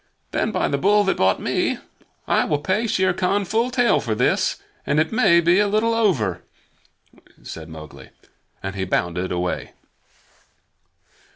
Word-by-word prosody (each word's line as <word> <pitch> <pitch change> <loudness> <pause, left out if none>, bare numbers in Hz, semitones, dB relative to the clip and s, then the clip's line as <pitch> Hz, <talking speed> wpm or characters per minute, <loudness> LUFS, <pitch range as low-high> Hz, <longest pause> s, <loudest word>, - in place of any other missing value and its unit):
"Then, - - 0
by - - 0
the 140 - -1
Bull 205 +5 +4
that 195 - 0
bought 95 0 +2
me, - - -1 0.5
I - - +3
will 150 - 0
pay 190 +10 -1
Shere 185 -3 +1
Khan 190 +2 0
full 225 +6 0
tale 245 - +2
for 115 -5 -2
this, - - +1 0.3
and 150 - +1
it 160 0 +1
may 220 -8 +4
be 175 +3 +3
a 205 - +3
little 215 +3 +1
over," 130 - +1 1.0
said 80 0 -9
Mowgli, 80 -2 -11 0.5
and 95 0 -4
he 95 - -2
bounded 90 0 -1
away. 90 0 -3
170 Hz, 155 wpm, -22 LUFS, -, 1.0 s, Bull